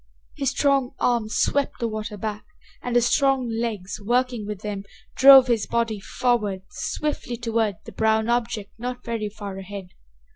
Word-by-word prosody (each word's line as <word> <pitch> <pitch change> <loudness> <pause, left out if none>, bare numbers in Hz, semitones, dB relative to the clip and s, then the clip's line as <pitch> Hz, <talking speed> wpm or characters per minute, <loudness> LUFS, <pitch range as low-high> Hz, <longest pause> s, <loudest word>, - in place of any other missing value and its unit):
His 275 -3 0
strong 275 -2 +1
arm 235 -3 +1
swept 280 +4 0
the 235 - 0
water 215 -1 -5
back, 210 0 -4 0.4
and 245 -1 -3
his 240 -1 +4
strong 270 -1 +2
legs, 225 -4 -3
working 240 0 0
with 210 -2 -5
them, 205 -2 -4 0.3
drove 270 -1 +9
his 235 -4 0
body 230 -3 0
forward 210 -3 -1
swiftly 295 -5 -3
toward 225 -3 0
the - - -9
brown 220 0 +1
object 230 -4 -1
not 245 +1 -5
very 225 -3 -2
far 200 -2 -7
ahead. 195 -1 -8
230 Hz, 155 wpm, -24 LUFS, 210-245 Hz, 0.4 s, drove